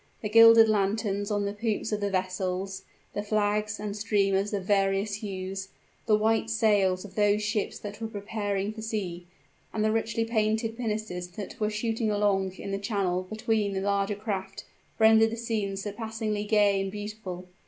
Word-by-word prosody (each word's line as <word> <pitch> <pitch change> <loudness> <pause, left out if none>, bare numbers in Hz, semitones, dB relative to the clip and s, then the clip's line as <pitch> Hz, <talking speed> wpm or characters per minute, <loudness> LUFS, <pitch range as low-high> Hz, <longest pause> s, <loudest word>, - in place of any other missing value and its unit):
The 210 - -1
gilded 230 +1 +8
lanterns 205 -1 0
on 205 -1 0
the 200 - -2
poops 220 +1 -2
of 210 -1 -1
the 200 - 0
vessels 185 0 -2 0.3
the 205 - -2
flags 210 0 0
and 205 -1 -4
streamers 200 -1 +1
of 200 -3 -2
various 195 +1 +1
hues 195 -2 -5 0.4
the 215 -2 +5
white 220 +1 +1
sails 205 -4 +2
of 195 - -11
those 205 +1 +2
ships 215 -1 -1
that 205 +1 -8
were 225 - -2
preparing 205 -1 -3
for 220 - -8
sea 190 -6 -4 0.4
and 215 -1 0
the 215 - +3
richly 225 0 0
painted 220 0 0
pinnaces 215 -6 -3
that 210 +6 -7
were 210 -1 +1
shooting 225 +1 -1
along 200 -2 +1
in 195 +1 -7
the 195 - -1
channel 200 -3 0
between 215 -2 0
the 190 - -2
larger 200 +1 0
craft 195 -2 -5 0.3
rendered 220 0 +6
the 230 - -5
scene 215 -4 -2
surpassingly 215 +1 -3
gay 205 -2 +3
and 195 0 -3
beautiful. 205 -3 -6
205 Hz, 170 wpm, -28 LUFS, 195-220 Hz, 0.4 s, gilded